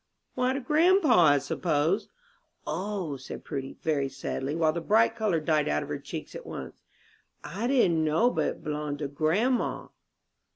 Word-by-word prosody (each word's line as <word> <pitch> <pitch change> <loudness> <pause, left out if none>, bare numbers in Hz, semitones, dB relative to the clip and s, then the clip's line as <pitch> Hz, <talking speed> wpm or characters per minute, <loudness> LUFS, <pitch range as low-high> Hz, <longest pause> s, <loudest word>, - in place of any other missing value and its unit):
"Why, 255 +1 +1
to 270 - -2
grandpa, 300 - +4
I 145 -1 +6
suppose." 160 +6 0 0.6
"O," 180 -2 -3
said 130 - -9
Prudy, 135 0 -5
very 140 -4 0
sadly, 135 +1 -4
while 160 -2 +2
the 170 - -3
bright 220 +6 +3
color 215 -7 +1
died 155 -1 +1
out 75 0 0
of - - -10
her - - -3
cheeks - - -7
at - - -8
once, 65 -2 -8 0.6
"I 215 +6 -3
didn't 190 -12 +3
know 160 +11 +3
but - - 0
it - - -5
b'longed 150 -2 -3
to 145 -1 -3
grandma." 175 - 0
165 Hz, 165 wpm, -28 LUFS, 150-225 Hz, 0.6 s, I